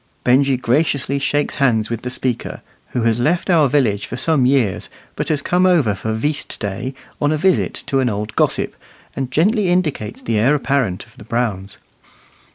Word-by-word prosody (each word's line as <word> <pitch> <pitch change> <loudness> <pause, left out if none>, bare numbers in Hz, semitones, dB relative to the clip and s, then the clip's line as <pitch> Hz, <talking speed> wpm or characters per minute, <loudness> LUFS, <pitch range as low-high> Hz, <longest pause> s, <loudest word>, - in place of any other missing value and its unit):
Benjy 135 +1 +3
graciously 140 +2 0
shakes 145 +1 0
hands 115 -4 +2
with 115 -1 -3
the 125 - -4
speaker, 125 -1 -3 0.3
who 125 - -2
has 115 0 +2
left 170 +8 +1
our 155 -5 +4
village 120 -8 +1
for - - -5
some 135 0 +2
years, 125 -8 +1 0.3
but - - -3
has 150 -3 0
come 180 +1 +2
over 155 - +3
for 105 +3 -4
"veast" 145 +6 -2
day 110 +6 -4 0.3
on 145 0 +2
a 155 - +1
visit 185 +4 +1
to 135 - 0
an 130 -2 +2
old 105 0 -4
gossip, - - +1 0.4
and 135 -2 -3
gently 190 - +2
indicates 155 -12 -1
the 115 -2 0
heir 130 +7 +4
apparent 130 -9 -1
of - - -23
the - - -11
Browns. 105 -4 -3
130 Hz, 180 wpm, -19 LUFS, 115-150 Hz, 0.4 s, our